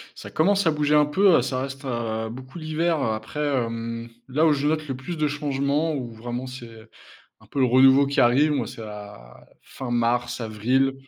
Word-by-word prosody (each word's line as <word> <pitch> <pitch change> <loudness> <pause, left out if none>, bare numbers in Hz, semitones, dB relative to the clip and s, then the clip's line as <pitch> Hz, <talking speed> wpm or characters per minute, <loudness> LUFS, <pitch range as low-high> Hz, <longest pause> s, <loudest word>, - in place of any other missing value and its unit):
Ça - - -10
commence 195 +3 +2
à - - +6
bouger 150 0 +1
un 150 -1 +5
peu, 185 0 +4
ça 130 0 -2
reste, 135 +1 -7
heu, 115 -3 -3
beaucoup 130 +5 -9
l'hiver. 155 -1 0
Après, 110 +6 -3
hem, 115 -4 -2 0.2
là 150 +5 +2
où 155 - +5
je 145 0 0
note 155 0 -1
le 130 - -3
plus 160 +6 -6
de 155 -1 +1
changements, 145 +2 -1
où 125 -4 -5
vraiment 120 +3 -5
c'est 115 -3 -11 0.5
un - - -18
peu 140 - -4
le 130 - +5
renouveau 130 +2 +6
qui 140 - +2
arrive. 135 +6 +4
Moi, 130 -7 -1
c'est 115 - -9
la 105 - -11 0.2
fin 130 -2 -7
mars, 120 +1 0
avril. 120 +5 +1
130 Hz, 195 wpm, -24 LUFS, 115-150 Hz, 0.5 s, à